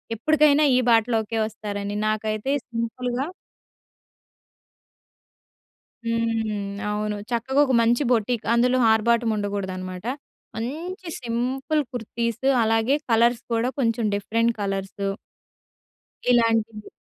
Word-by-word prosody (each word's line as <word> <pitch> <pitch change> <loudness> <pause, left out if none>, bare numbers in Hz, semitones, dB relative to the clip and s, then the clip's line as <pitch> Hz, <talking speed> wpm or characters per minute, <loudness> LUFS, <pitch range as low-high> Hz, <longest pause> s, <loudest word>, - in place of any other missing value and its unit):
ఎప్పడుకైనా 300 +4 +4
ఈ - - +4
బాటలోకే 225 -1 +2
వస్తారని 205 -2 -5
నాకైతే 215 +3 -1 0.2
సింపుల్‌గా 245 +2 -2 2.8
హ్మ్. 225 -3 -1 0.2
అవును. 210 0 -2
చక్కగా 250 +4 +1
ఒక 265 - 0
మంచి 235 +4 +3
బోటిక్ 235 -1 +1
అందులో 250 +2 +3
ఆర్భాటం 235 +1 +2
ఉండకూడదనమాట. 190 -1 -4 0.5
మంచి 335 - -5
సింపుల్ 255 +6 -1
కుర్తీస్ 235 +1 -3 0.2
అలాగే 225 +4 +2 0.2
కలర్స్ 235 +1 +3
కూడా 230 +2 +1
కొంచెం 230 -3 +1
డిఫరెంట్ 230 +3 +1
కలర్స్. 195 0 -3 1.2
ఇలాంటివి. 225 -3 +2
230 Hz, 90 wpm, -24 LUFS, 215-245 Hz, 2.8 s, ఎప్పడుకైనా